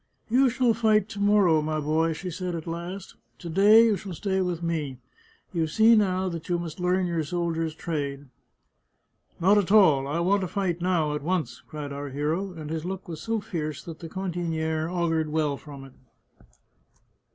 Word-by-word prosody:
" - - -41
You 260 +2 +5
shall 245 -1 +2
fight 215 -2 +2
to 205 - -7
morrow, 200 -6 +4
my 155 0 -1
boy," 160 +2 +1
she 180 +3 -6
said 180 0 -4
at 160 - -6
last. 170 +3 -6
" - - -44
To 170 - -8
day 205 +6 +6
you 220 -2 +3
shall 190 -1 -7
stay 190 +2 -1
with 175 -2 -2
me. 155 -6 -2 0.6
You 165 -2 0
see 220 +8 +5
now 190 -3 +2
that 165 -1 -7
you 175 - +2
must 170 -1 -6
learn 180 +1 +1
your 170 -2 -1
soldier's 165 -1 -2
trade." 145 -4 -4 0.6
" - - -42
Not 195 +4 +5
at 195 -1 -1
all. 155 -11 +5
I 150 +4 -1
want 195 +4 +2
to 185 - -2
fight 180 -2 -2
now, 170 -5 +1
at 150 - -3
once," 165 -4 -2
cried 145 0 -6
our 140 0 -5
hero, 155 +8 -2
and 155 -3 -8
his 160 -1 -3
look 190 +2 -5
was 160 -2 -7
so 225 +2 -1
fierce 155 -8 -4
that 165 -2 -9
the 165 - -8
cantiniere 165 -3 -2
augured 165 -3 0
well 150 -2 0
from 140 -1 -11
it. 135 -1 -13
170 Hz, 195 wpm, -26 LUFS, 155-190 Hz, 0.6 s, day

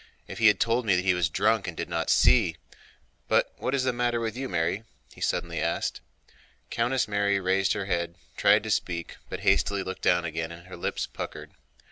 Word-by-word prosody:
"If - - -8
he 110 - +6
had 105 - +5
told 115 +2 +2
me 95 -5 +3
he 95 -1 +3
was 90 -2 +1
drunk 110 +4 +1
and 85 - -6
did - - -3
not - - -2
see... - - +4 0.7
But - - +2
what 130 - -1
is 135 - +1
the 130 -1 +1
matter 120 -1 0
with 115 -1 -3
you, 135 +1 -4
Mary?" 85 +4 -1 0.3
he - - -15
suddenly - - -1
asked. - - -1 0.7
Countess 120 +2 +1
Mary 100 -1 +1
raised 95 0 +2
her 100 - -3
head 85 -3 -1
and 85 - -27 0.2
tried 105 +1 +4
to 110 - -3
speak, 85 -4 -2
but - - -5
hastily 100 -1 +2
looked 95 - -6
down 85 -1 +3
again 80 0 -3
and 85 +1 -11
her 95 - -10
lips 85 - -2
puckered. - - -7
100 Hz, 205 wpm, -27 LUFS, 85-115 Hz, 0.7 s, he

